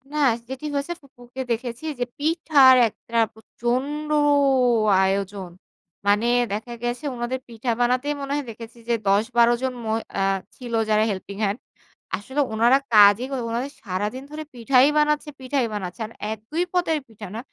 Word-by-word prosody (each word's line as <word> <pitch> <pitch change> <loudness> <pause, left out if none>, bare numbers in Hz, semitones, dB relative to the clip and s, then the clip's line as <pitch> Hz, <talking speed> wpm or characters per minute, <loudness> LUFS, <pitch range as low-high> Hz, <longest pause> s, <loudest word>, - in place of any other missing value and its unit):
না 300 - -4 0.3
যেটি 265 +3 -6
হয়েছে 280 +5 -2
ফুপুকে 250 -2 -10
দেখেছি 240 +4 -3
যে 245 - 0
পিঠার 295 -4 +5
একটা 230 +2 -7 0.2
প্রচণ্ড 255 +7 -3 1.0
আয়োজন। 195 -1 -2 0.6
মানে 205 +3 +3 0.3
দেখা 220 +4 -4
গেছে 240 +4 -3
ওনাদের 240 +2 -3
পিঠা 235 +1 -3
বানাতেই 250 +4 +1
মনে 275 0 -5
হয় 290 - -1
দেখেছি 230 +1 -10
যে - - +3
১০ 200 +2 +4
১২ 235 0 +6
জন 260 -1 -1
মই 220 0 0 0.2
আ - - +2 0.3
ছিল 245 -2 -8 0.2
যারা 215 0 +4
হেল্পিং 195 0 -5
হ্যান্ড। 205 +3 0 0.6
আসলে 265 +8 -2
ওনারা 235 +4 +5 0.2
কাজই 205 +3 +7 0.2
ওনাদের 245 +5 -3
সারাদিন 210 +6 -3
ধরে 310 +1 -6
পিঠাই 250 +2 +4
বানাচ্ছে, 300 0 +2
পিঠাই 260 0 0
বানাচ্ছে 190 +1 -5
আর 215 - -10 0.2
১-২ 220 - -3
পদের 350 -3 +1
পিঠা 220 -2 -10
না। - - -4
240 Hz, 150 wpm, -23 LUFS, 215-275 Hz, 1.0 s, কাজই